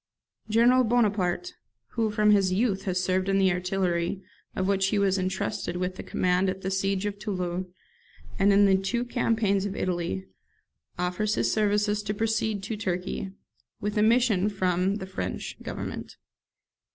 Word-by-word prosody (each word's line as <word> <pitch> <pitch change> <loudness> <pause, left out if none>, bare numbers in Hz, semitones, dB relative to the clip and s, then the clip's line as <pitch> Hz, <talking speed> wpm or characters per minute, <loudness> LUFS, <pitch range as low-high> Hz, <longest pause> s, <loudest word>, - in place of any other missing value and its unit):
General 240 +4 +5
Bonaparte, 220 - +1 0.4
who, 225 -2 0
from 210 0 +3
his 195 -3 +4
youth, 195 0 0
has 185 -1 0
served 185 +1 0
in 195 - +3
the 190 -1 +4
artillery, 180 0 -1 0.3
of 185 - 0
which 195 -1 +2
he 205 - 0
was 195 -1 +2
entrusted 175 -4 -2
with 180 0 -2
the - - -6
command 180 +1 +1
at 190 +1 -4
the 190 - -3
siege 195 +1 0
of 205 -1 -3
Toulon, 185 -3 -3 0.7
and 200 +1 +5
in 200 +1 +6
the 190 -1 +5
two 235 +6 -1
campaigns 220 -5 +1
of 195 - -5
Italy, 170 - -2 0.7
offers 180 +4 0
his - - +1
services 210 0 +1
to 210 0 -3
proceed 220 -1 -1
to 220 +3 -3
Turkey, 190 -1 -3 0.5
with 205 0 -3
a 210 - +2
mission 220 -3 +3
from 185 -1 0
the 190 - -5
(French) 190 0 -5
Government. - - -6
195 Hz, 160 wpm, -27 LUFS, 185-210 Hz, 0.7 s, in